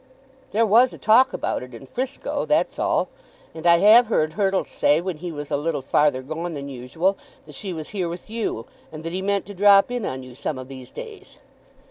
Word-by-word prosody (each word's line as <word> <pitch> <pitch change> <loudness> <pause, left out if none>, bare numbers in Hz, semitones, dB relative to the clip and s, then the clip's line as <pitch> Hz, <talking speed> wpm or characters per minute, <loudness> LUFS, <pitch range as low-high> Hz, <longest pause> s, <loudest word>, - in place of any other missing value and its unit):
"There 225 +2 +3
was 235 +4 +5
a - - -9
talk 235 +5 +5
about - - -2
it 125 -1 -10
in 125 - -11
Frisco; 260 - -3
that's - - +1
all. - - +1 0.4
And 165 +1 -3
I 170 0 +7
have 215 +6 +7
heard 155 -8 +1
Hurtle 195 0 +1
say 145 +2 +2
when 180 -1 -4
he 175 +2 -6
was 145 -2 -7
a - - +2
little 145 -2 -2
farther 140 -2 +2
gone 165 +5 -5
than 140 -1 -6
usual 150 +10 -1 0.3
that - - -13
she 200 -3 -5
was 160 -3 -6
here 185 -5 -2
with 170 +2 -8
you, 220 - -3 0.3
and 155 0 -9
that 165 +1 -5
he 185 - -2
meant 200 0 0
to 205 - -9
drop 200 +3 +5
in 245 -2 -2
on 130 -7 -4
you 130 -1 -11
some 135 +3 -4
of 130 0 -8
these 130 -2 -10
days." 445 -4 -10
170 Hz, 220 wpm, -23 LUFS, 145-205 Hz, 0.4 s, I